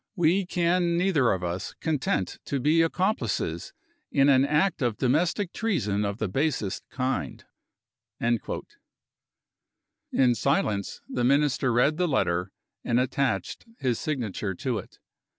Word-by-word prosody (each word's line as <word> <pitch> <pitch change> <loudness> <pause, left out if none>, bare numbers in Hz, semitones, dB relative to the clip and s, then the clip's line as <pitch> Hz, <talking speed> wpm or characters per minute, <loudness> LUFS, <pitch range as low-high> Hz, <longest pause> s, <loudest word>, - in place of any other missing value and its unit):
We 175 +1 +2
can 175 -1 +1
neither 170 -9 +3
of 95 -2 -1
us 90 +2 -4
content 140 - -1
to 140 - -2
be 155 +5 +3
accomplices 165 - -1 0.4
in 140 0 +4
an 135 -1 +5
act 150 +5 +1
of 120 -4 0
domestic 170 - +1
treason 105 - 0
of 100 0 -3
the 110 - -1
basest 125 - -1
kind." 130 - -3 0.7
In 120 -1 +1 1.9
silence, 100 -2 0
the 125 - -2
Minister 135 -1 +2
read 125 +6 +3
the 180 0 +1
letter, 90 - 0 0.3
and 120 +1 +2
attached 125 - -1
his 125 -5 -1
signature 110 - -3
to 120 +2 -2
it. - - -12
130 Hz, 125 wpm, -26 LUFS, 105-160 Hz, 1.9 s, an